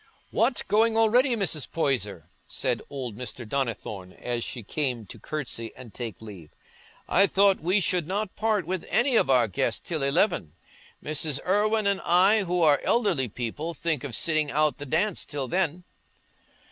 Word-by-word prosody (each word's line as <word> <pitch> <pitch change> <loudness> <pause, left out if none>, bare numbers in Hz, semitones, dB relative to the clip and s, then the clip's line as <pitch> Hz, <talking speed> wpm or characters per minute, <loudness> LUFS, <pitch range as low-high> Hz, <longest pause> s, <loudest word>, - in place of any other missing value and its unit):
"What! 240 +2 +1
Going 220 +2 +3
already, 240 +3 +4
Mrs. 175 - -2
Poyser?" 105 - -2 0.2
said - - -1
old 130 -6 -5
Mr. 120 0 -5
Donnithorne, 105 -7 -3
as 120 -1 -4
she 120 - -6
came 125 -1 -2
to - - -11
curtsy 125 -7 -5
and 120 -4 -12
take 115 -2 -6
leave; 95 -8 -10 0.6
"I 195 +2 +4
thought 195 0 +4
we 180 +6 +2
should 180 -3 +1
not 200 +1 -3
part 215 -4 0
with 185 +1 -3
any 250 +1 +2
of 140 - +3
our 125 -3 +4
guests 95 - 0
till 160 -4 -3
eleven. 140 - +1 0.5
Mrs. 150 -1 -1
Irwine 210 +3 +2
and 200 -1 +1
I, 195 +4 +4
who 175 -1 +1
are 150 -2 +5
elderly 195 - +2
people, 125 +9 -4
think 155 -2 -1
of 135 -6 -4
sitting 155 -2 +1
out 150 0 +2
the 145 - -6
dance 175 +7 0
till 145 -3 -4
then." 180 +3 -1
155 Hz, 165 wpm, -26 LUFS, 125-195 Hz, 0.6 s, are